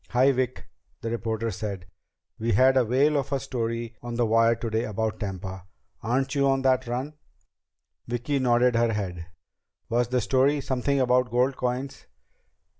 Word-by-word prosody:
"Hi, 130 Hz, +3 st, +4 dB
Vic!" 130 Hz, -1 st, -2 dB, 0.4 s
the 115 Hz, -, -3 dB
reporter 115 Hz, -1 st, -2 dB
said. 100 Hz, -5 st, -5 dB, 0.5 s
"We 115 Hz, 0 st, 0 dB
had 130 Hz, +6 st, +5 dB
a 130 Hz, -, +5 dB
whale 140 Hz, +6 st, +3 dB
of 140 Hz, 0 st, -2 dB
a 140 Hz, -, +1 dB
story 115 Hz, -3 st, -3 dB
on 120 Hz, 0 st, -5 dB
the 120 Hz, 0 st, +2 dB
wire 115 Hz, +1 st, +4 dB
today 115 Hz, 0 st, -2 dB
about 110 Hz, +1 st, -2 dB
Tampa. 95 Hz, -2 st, -6 dB, 0.3 s
Aren't 130 Hz, +4 st, 0 dB
you 140 Hz, -1 st, +2 dB
on 135 Hz, 0 st, +1 dB
that 130 Hz, -1 st, +2 dB
run?" 130 Hz, +5 st, -3 dB, 0.9 s
Vicki 120 Hz, +4 st, -1 dB
nodded 125 Hz, -1 st, +3 dB
her 115 Hz, -1 st, +2 dB
head. 90 Hz, -5 st, -4 dB, 0.6 s
"Was 120 Hz, +1 st, +1 dB
the 125 Hz, +1 st, +1 dB
story 135 Hz, +5 st, +2 dB
something 135 Hz, +1 st, 0 dB
about 125 Hz, -1 st, +3 dB
gold 125 Hz, +3 st, +1 dB
coins?" 130 Hz, +2 st, -4 dB
120 Hz, 160 wpm, -26 LUFS, 115-130 Hz, 0.9 s, had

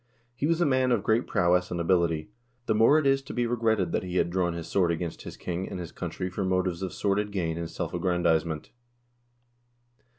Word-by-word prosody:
He 135 Hz, +4 st, -1 dB
was 165 Hz, 0 st, +2 dB
a 175 Hz, -, +3 dB
man 130 Hz, -2 st, +2 dB
of 115 Hz, -5 st, +2 dB
great 110 Hz, +2 st, +2 dB
prowess 90 Hz, +1 st, +2 dB
and 85 Hz, -, -3 dB
ability. 85 Hz, 0 st, +1 dB, 0.3 s
The 110 Hz, -, +2 dB
more 115 Hz, +7 st, +5 dB
it 155 Hz, -, +1 dB
is 135 Hz, 0 st, +3 dB
to 135 Hz, -, -9 dB
be 120 Hz, -, +1 dB
regretted 110 Hz, -5 st, +1 dB
that -, -, 0 dB
he 90 Hz, -1 st, -6 dB
had 85 Hz, -, +1 dB
drawn 90 Hz, -1 st, 0 dB
his 85 Hz, -1 st, -5 dB
sword 90 Hz, -3 st, +2 dB
against 85 Hz, 0 st, -4 dB
his -, -, -9 dB
king 90 Hz, +1 st, -4 dB
and 90 Hz, -, -5 dB
his 85 Hz, -3 st, -6 dB
country 90 Hz, -, -4 dB
for 95 Hz, +2 st, -3 dB
motives 90 Hz, -1 st, 0 dB
of 95 Hz, -2 st, -3 dB
sordid 105 Hz, +1 st, 0 dB
gain 85 Hz, -5 st, -1 dB
and 85 Hz, -1 st, -4 dB
self -, -, -4 dB
aggrandizement. 80 Hz, -3 st, 0 dB
95 Hz, 210 wpm, -27 LUFS, 85-110 Hz, 0.3 s, more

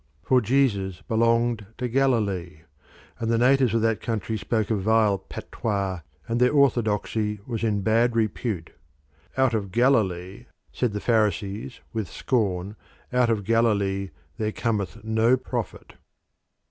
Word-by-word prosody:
For 130 Hz, +5 st, +3 dB
Jesus 105 Hz, -, +1 dB
belonged 115 Hz, 0 st, +1 dB
to 125 Hz, -, -2 dB
Galilee, 105 Hz, -, 0 dB, 0.6 s
and 115 Hz, -, -2 dB
the 115 Hz, -, +2 dB
natives 125 Hz, -1 st, +3 dB
of 115 Hz, -, +1 dB
that 115 Hz, -1 st, +1 dB
country 110 Hz, -1 st, -2 dB
spoke 110 Hz, 0 st, -1 dB
a -, -, +3 dB
vile 105 Hz, 0 st, +2 dB
patois, 100 Hz, -2 st, -3 dB, 0.3 s
and 115 Hz, +1 st, -1 dB
their 125 Hz, 0 st, +4 dB
orthodoxy 110 Hz, -5 st, +1 dB
was 115 Hz, -3 st, -4 dB
in 105 Hz, -3 st, +1 dB
bad 115 Hz, +3 st, +2 dB
repute. 110 Hz, -5 st, -1 dB, 0.7 s
"Out 130 Hz, -2 st, +3 dB
of 100 Hz, -4 st, -2 dB
Galilee," 100 Hz, -6 st, +1 dB, 0.3 s
said 120 Hz, -5 st, -1 dB
the 105 Hz, -, -2 dB
Pharisees 110 Hz, +1 st, 0 dB
with 110 Hz, -6 st, -3 dB
scorn, 100 Hz, -3 st, -1 dB, 0.4 s
"out 125 Hz, -1 st, +3 dB
of 110 Hz, -3 st, 0 dB
Galilee 100 Hz, -3 st, +1 dB, 0.3 s
there 110 Hz, -2 st, -1 dB
cometh 105 Hz, -4 st, -2 dB
no 110 Hz, +3 st, +3 dB
prophet." 130 Hz, -, -5 dB
110 Hz, 135 wpm, -25 LUFS, 100-120 Hz, 0.7 s, their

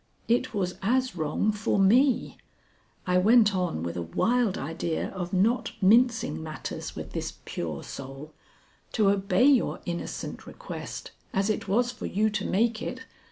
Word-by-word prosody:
It 245 Hz, +2 st, +2 dB
was 185 Hz, -4 st, -2 dB
as 255 Hz, +4 st, +1 dB
wrong 160 Hz, +6 st, 0 dB
for 210 Hz, 0 st, -1 dB
me," 240 Hz, +7 st, +4 dB, 0.7 s
I 180 Hz, 0 st, +3 dB
went 215 Hz, +1 st, +5 dB
on 180 Hz, -, -1 dB
with 85 Hz, 0 st, -4 dB
a 85 Hz, -, -2 dB
wild 220 Hz, -, +1 dB
idea 160 Hz, +3 st, -3 dB
of 180 Hz, -2 st, -5 dB
not 225 Hz, +6 st, +1 dB
mincing 225 Hz, +2 st, +3 dB
matters 155 Hz, -1 st, -6 dB
with -, -, -7 dB
this -, -, -4 dB
pure 80 Hz, -4 st, -4 dB
soul, 135 Hz, +3 st, -8 dB, 0.6 s
"to 210 Hz, -3 st, +4 dB
obey 200 Hz, +5 st, +2 dB
your 275 Hz, -4 st, +3 dB
innocent 170 Hz, -1 st, -5 dB
request, -, -, -7 dB, 0.2 s
as 195 Hz, +2 st, +2 dB
it 210 Hz, -, -3 dB
was 240 Hz, +5 st, +2 dB
for -, -, -6 dB
you 215 Hz, +3 st, +1 dB
to 210 Hz, -, -2 dB
make 225 Hz, +2 st, +1 dB
it. 255 Hz, +1 st, -5 dB
200 Hz, 155 wpm, -27 LUFS, 175-235 Hz, 0.7 s, went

